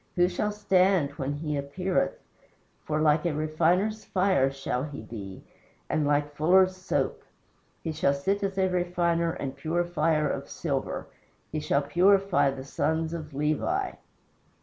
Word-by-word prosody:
Who 175 -1 +4
shall 210 +3 -1
stand 190 -6 +2
when 140 0 -3
He 150 0 -3
appeareth? 180 +7 -1 0.7
For, 155 0 -1
like 150 0 +3
a 160 - -1
refiner's 170 +8 +1
fire 185 -8 +2
shall 135 -2 -3
He 145 -2 -7
be, 100 -4 -8 0.5
And 155 -2 +1
like 145 0 +1
fullers' 185 +5 +4
soap. 185 0 -2 0.6
He 165 - -2
shall 150 -2 +1
sit 195 +9 -1
as 195 -1 -2
a 190 -1 +3
refiner 175 -2 0
and 135 -1 -5
purifier 160 0 0
of - - -4
silver. - - -3 0.5
He 155 - -2
shall 145 -1 +1
purify 180 -2 +3
the 135 -1 -5
sons 160 +3 -1
of 155 -4 -7
Levi." 155 - 0
160 Hz, 145 wpm, -27 LUFS, 145-185 Hz, 0.7 s, Who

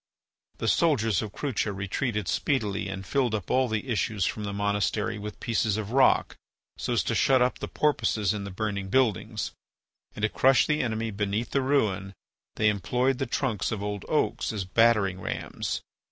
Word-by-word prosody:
The - - -3
soldiers 115 - +2
of 110 - -5
Crucha 120 -4 -2
retreated 100 +2 -2
speedily 105 -8 0
and 95 0 -6
filled 125 0 +1
up 100 -5 -4
all 130 0 +3
the 110 +2 -2
issues 110 -5 0
from 105 - -2
the 100 - -3
monastery 105 +1 -1
with 105 +1 -7
pieces 110 -3 0
of 110 0 -4
rock 135 +1 +4 0.4
so - - -2
as - - +2
to - - -1
shut 130 -1 +4
up 125 +1 +1
the - - -4
Porpoises 110 -9 +1
in 105 -1 -4
the 100 - -5
burning 100 0 -3
buildings. 110 -2 +1 0.6
And 105 - -6
to 110 - +3
crush 135 +3 +4
the 150 0 +1
enemy 115 -2 -2
beneath 105 +3 -2
the 140 - +2
ruin 105 -8 0 0.4
they 105 - +2
employed 125 +6 0
the 135 - -1
trunks 120 -3 -1
of 105 -3 -3
old 105 -2 -3
oaks - - 0
as 105 -4 -3
battering 100 -2 +3
rams. - - -4
110 Hz, 180 wpm, -27 LUFS, 100-125 Hz, 0.6 s, rock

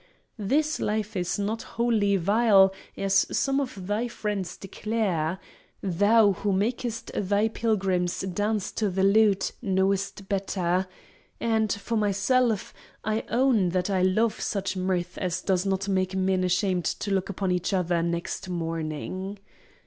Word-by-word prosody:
This 300 - +1
life 215 0 -2
is 180 -2 -1
not 210 +3 -2 0.2
wholly 215 -4 +2
vile, 195 0 +5 0.2
as 195 0 +2
some 275 0 +1
of 250 -9 -5
thy 210 +5 -1
friends 210 -5 -4
declare 195 -5 -2 0.5
(Thou, 205 +3 +4
who 200 +2 -1
makest 230 +3 -2
thy 205 +2 +1
pilgrims 195 -6 0
dance 205 +2 -1
to 215 -2 -1
the 190 +1 0
lute, 200 0 +4
knowest 195 +1 0
better); 190 -2 0 0.5
and, 220 -2 +1
for 225 +3 -2
myself, 210 +2 +1 0.3
I 215 +1 -1
own 240 -7 +3
that 180 +2 -1
I 190 -1 +1
love 210 +5 +2
such 200 -1 -2
mirth 185 -1 -2
as 180 0 -2
does 190 0 +1
not 195 0 -1
make 190 -1 0
men 190 0 +1
ashamed 185 -1 +1
to 205 - -2
look 190 -1 0
upon 195 -1 -1
each 180 +1 0
other 180 -3 +1
next 170 +2 -3
morning. 165 +3 -4
195 Hz, 140 wpm, -26 LUFS, 185-215 Hz, 0.5 s, vile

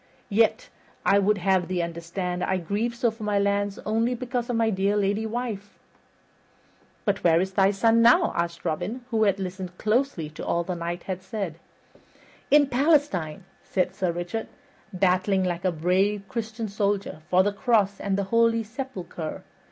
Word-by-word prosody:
Yet 225 - +2 0.4
I 200 - +5
would 205 +1 +2
have 185 -1 +1
thee 180 -2 -1
understand 170 +2 -4
I 190 - +1
grieve 205 +7 -2
so 235 -1 +1
for 220 +1 -15
my 210 -1 0
lands 200 0 0
only 225 +3 +1
because 245 0 -3
of 245 - 0
my 225 -1 +2
dear 200 +1 +1
lady 205 +2 0
wife." 220 -4 -5 1.3
"But 205 -2 0
where 165 -1 +5
is 190 +1 -1
thy 195 0 +4
son 225 +3 +3
now?" 245 +10 +5
asked 170 0 -2
Robin, 230 +10 -3
who 220 -1 +3
had 200 -2 +2
listened 185 -1 -5
closely 215 - 0
to 155 - -8
all 170 - 0
the 180 - -3
Knight 170 0 -4
had 185 -1 -4
said. 190 -6 -5 0.9
"In 295 0 +6
Palestine," 265 - +1 0.2
said 185 -1 -1
Sir 185 -2 -1
Richard, 175 +6 -4 0.4
"battling 185 +1 +2
like 175 -1 -2
a 185 - +3
brave 185 +5 +1
Christian 225 -2 -4
soldier 200 -4 -1
for 185 +1 +5
the 205 +1 0
cross 205 -3 +1
and 195 -1 -1
the 200 - 0
holy 230 0 +4
sepulcher. 210 - -6
200 Hz, 165 wpm, -25 LUFS, 180-225 Hz, 1.3 s, In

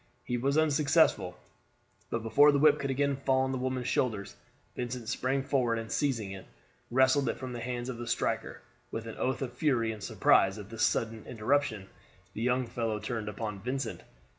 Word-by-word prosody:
He 125 - -2
was 135 +4 +1
unsuccessful, 150 - +3 0.7
but 115 -1 -2
before 145 +7 +6
the 145 - +2
whip 150 +1 +5
could 140 - -2
again 140 +1 +1
fall 135 -1 +2
on 130 0 0
the 130 - -2
woman's 130 -1 -2
shoulders, 110 -6 -1 0.4
Vincent 120 -1 -4
sprang 135 +1 0
forward, 125 -4 +1
and 115 -1 -5
seizing 115 -9 0
it, 95 -1 -9 0.4
wrested 130 +3 +3
it - - -1
from 130 -1 -6
the 120 - -5
hands 120 +1 -4
of 125 -2 -5
the 120 - -5
striker. 115 - -1 0.3
With 115 0 -5
an 115 - -7
oath 130 +1 -1
of 125 -2 -5
fury 125 -4 +1
and 110 -1 -8
surprise 95 0 +3
at 105 0 -9
this 115 -1 -5
sudden 110 -1 +1
interruption, 110 -3 0 0.5
the 110 - -5
young 125 +1 +1
fellow 115 -2 -2
turned 110 0 -4
upon 105 -1 -5
Vincent. 130 +6 -3
125 Hz, 190 wpm, -30 LUFS, 110-135 Hz, 0.7 s, before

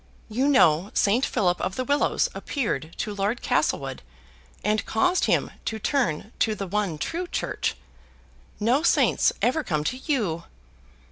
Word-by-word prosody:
You 250 +6 +1
know 190 - +4
Saint 220 +6 +3
Philip 180 -3 +1
of 185 +1 -2
the 255 - -1
Willows 285 +2 +2
appeared 170 - -3
to 210 - -3
Lord 205 +4 -1
Castlewood, 135 -3 0 0.6
and 210 +2 +1
caused 360 +12 +2
him - - +1
to 220 - -2
turn 220 - -1
to 220 -1 +2
the 200 - -4
one 195 -4 -1
true 340 - -3
church. - - -2 0.8
No 240 +7 +2
saints 335 - +3
ever 305 +6 +2
come 150 - -1
to 255 - -2
you." 220 - -1
215 Hz, 145 wpm, -25 LUFS, 180-260 Hz, 0.8 s, know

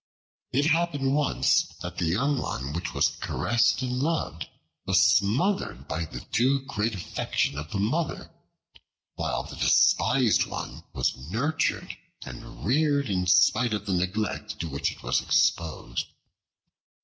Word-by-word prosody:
It 140 +3 +2
happened 155 -4 +1
once 105 - +3 0.2
that 90 0 -6
the 90 - +1
young 135 - +1
one 70 +3 -4
which 85 +1 -4
was - - +4
caressed 120 +2 0
and 125 0 -2
loved 160 +3 -2 0.4
was 95 -1 +4
smothered 105 - +2
by 80 0 -2
the - - -8
too 135 +3 +1
great 115 -4 -1
affection 90 -5 -2
of 75 +1 -6
the 100 - -3
Mother, 140 +12 -1 0.8
while - - -2
the - - -9
despised 125 -1 +3
one - - -6
was - - 0
nurtured 140 - -1 0.3
and 65 -2 -9
reared 140 0 +2
in 90 -1 0
spite 105 +5 +4
of 105 -1 -5
the 100 - -1
neglect 90 +4 -2
to 85 - -3
which 70 -2 -1
it - - -13
was - - +1
exposed. 80 -7 0
110 Hz, 140 wpm, -26 LUFS, 90-140 Hz, 0.8 s, was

